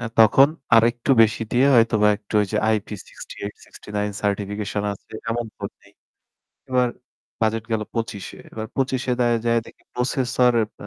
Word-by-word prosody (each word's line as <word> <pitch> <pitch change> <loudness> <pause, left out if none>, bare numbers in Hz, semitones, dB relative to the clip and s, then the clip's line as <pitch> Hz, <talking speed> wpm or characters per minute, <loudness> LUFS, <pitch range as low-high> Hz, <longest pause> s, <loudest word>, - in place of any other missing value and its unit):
আ - - -7 0.2
তখন 135 +5 +7 0.3
আরেকটু 115 +3 +2
বেশি 110 +1 +1
দিয়ে 125 +3 +4
হয়তোবা 115 -2 +4
একটু 105 +1 -13
ওইযে 105 +1 -3 0.2
IP68, 105 -1 -7
69 105 0 -5
সার্টিফিকেশন 105 0 -2
আছে 100 - -14 0.2
এমন 120 0 -2
ফোন - - -5
নেই। - - -21 0.8
এবার 125 -1 +2 0.5
বাজেট 110 0 0
গেল 110 - 0
২৫ 115 -4 -3
এ, - - -12
এবার 110 0 -5
২৫ 130 -1 0 0.2
দায় 120 -1 +3
যায়ে 115 0 +3
দেখি - - -16
প্রসেসর 125 0 +1
অ্যা 105 -2 -3
115 Hz, 150 wpm, -22 LUFS, 105-120 Hz, 0.8 s, তখন